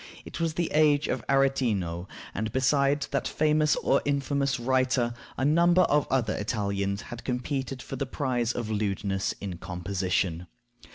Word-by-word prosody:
It -, -, -7 dB
was 165 Hz, -2 st, -1 dB
the 175 Hz, 0 st, -1 dB
age 150 Hz, -1 st, +4 dB
of 125 Hz, -, -2 dB
Aretino; 115 Hz, -11 st, +1 dB, 0.3 s
and 110 Hz, +2 st, -2 dB
besides 140 Hz, +2 st, +2 dB
that -, -, -1 dB
famous 155 Hz, 0 st, +2 dB
or 135 Hz, -, +2 dB
infamous 140 Hz, -1 st, 0 dB
writer, 130 Hz, -1 st, +1 dB, 0.2 s
a 130 Hz, -, 0 dB
number 170 Hz, +4 st, +5 dB
of 150 Hz, -3 st, +2 dB
other 120 Hz, -5 st, +1 dB
Italians 100 Hz, -2 st, -2 dB
had 120 Hz, 0 st, -9 dB
competed 130 Hz, 0 st, -3 dB
for -, -, -6 dB
the 140 Hz, -, -2 dB
prize 125 Hz, -4 st, -1 dB
of 115 Hz, -3 st, -4 dB
lewdness 100 Hz, -2 st, -1 dB
in 95 Hz, -4 st, -6 dB
composition. 90 Hz, -1 st, -2 dB
130 Hz, 150 wpm, -27 LUFS, 100-140 Hz, 0.3 s, number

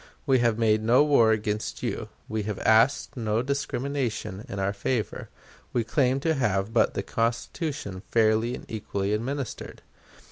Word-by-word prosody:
We 135 Hz, -3 st, +4 dB
have 115 Hz, -2 st, +2 dB
made 110 Hz, -2 st, +3 dB
no 120 Hz, +6 st, +5 dB
war 140 Hz, -7 st, +5 dB
against 105 Hz, -1 st, -2 dB
you. -, -, -3 dB, 0.2 s
We 110 Hz, 0 st, -2 dB
have 105 Hz, -, -3 dB
asked 115 Hz, +5 st, +3 dB
no 110 Hz, -1 st, 0 dB
discrimination 135 Hz, -6 st, -2 dB
in 100 Hz, -, -5 dB
our 95 Hz, +1 st, 0 dB
favor. 110 Hz, +3 st, -2 dB, 0.4 s
We 120 Hz, -, +1 dB
claim 130 Hz, +3 st, +1 dB
to 160 Hz, +2 st, +2 dB
have 105 Hz, -6 st, 0 dB
but 120 Hz, -, +3 dB
the -, -, -1 dB
Constitution 115 Hz, -, -2 dB
fairly 110 Hz, +1 st, +2 dB
and -, -, -10 dB
equally 100 Hz, -2 st, -2 dB
administered. 130 Hz, +4 st, -4 dB
115 Hz, 150 wpm, -26 LUFS, 105-130 Hz, 0.4 s, no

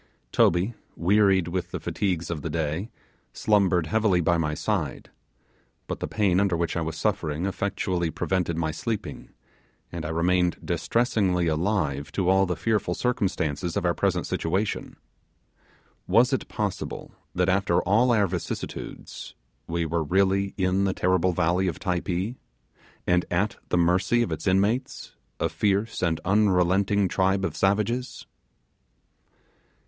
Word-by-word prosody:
Toby, 90 Hz, +7 st, +3 dB, 0.2 s
wearied 95 Hz, 0 st, +3 dB
with 90 Hz, 0 st, -3 dB
the -, -, -4 dB
fatigues 90 Hz, -4 st, -2 dB
of 80 Hz, -3 st, -4 dB
the 80 Hz, -, -4 dB
day, 80 Hz, +6 st, -2 dB, 0.4 s
slumbered 95 Hz, -6 st, +2 dB
heavily 105 Hz, +1 st, +2 dB
by 85 Hz, 0 st, +2 dB
my 75 Hz, -2 st, 0 dB
side; -, -, -3 dB, 0.7 s
but -, -, -5 dB
the -, -, -3 dB
pain 95 Hz, -4 st, +2 dB
under 100 Hz, -4 st, +2 dB
which 85 Hz, 0 st, -1 dB
I 85 Hz, -, 0 dB
was 80 Hz, -1 st, -4 dB
suffering 75 Hz, +3 st, -1 dB
effectually 95 Hz, -3 st, -1 dB
prevented 85 Hz, -1 st, -1 dB
my 80 Hz, -1 st, 0 dB
sleeping, 110 Hz, +5 st, -5 dB, 0.6 s
and 85 Hz, -1 st, -5 dB
I 75 Hz, -, -3 dB
remained 90 Hz, +1 st, +1 dB
distressingly 100 Hz, -7 st, +1 dB
alive 80 Hz, -3 st, -1 dB
to 95 Hz, -2 st, +1 dB
all 95 Hz, 0 st, +4 dB
the 90 Hz, -, -1 dB
fearful 105 Hz, -6 st, 0 dB
circumstances 90 Hz, -, -1 dB
of -, -, -1 dB
our 85 Hz, -, +3 dB
present 90 Hz, -2 st, 0 dB
situation. 95 Hz, +6 st, -2 dB, 1.1 s
Was -, -, +4 dB
it -, -, -1 dB
possible -, -, -4 dB, 0.2 s
that, 90 Hz, 0 st, +2 dB
after 95 Hz, -2 st, +2 dB
all 115 Hz, +6 st, +3 dB
our 105 Hz, -3 st, +4 dB
vicissitudes, 90 Hz, -2 st, -6 dB, 0.3 s
we 85 Hz, 0 st, -1 dB
were 80 Hz, +1 st, -1 dB
really 95 Hz, +4 st, +1 dB
in 95 Hz, 0 st, +1 dB
the 95 Hz, -, +1 dB
terrible 90 Hz, 0 st, +2 dB
valley 90 Hz, +2 st, +1 dB
of 85 Hz, -, -2 dB
Typee, 95 Hz, +4 st, -2 dB, 0.7 s
and 90 Hz, 0 st, +3 dB
at 100 Hz, +4 st, 0 dB
the -, -, +1 dB
mercy 90 Hz, +7 st, +3 dB
of -, -, -4 dB
its -, -, -4 dB
inmates, 100 Hz, +6 st, 0 dB, 0.3 s
a -, -, +1 dB
fierce 105 Hz, +2 st, 0 dB
and 80 Hz, -3 st, +1 dB
unrelenting 95 Hz, 0 st, +3 dB
tribe 95 Hz, +1 st, +1 dB
of -, -, -3 dB
savages? 105 Hz, +6 st, 0 dB
90 Hz, 140 wpm, -26 LUFS, 85-100 Hz, 1.1 s, all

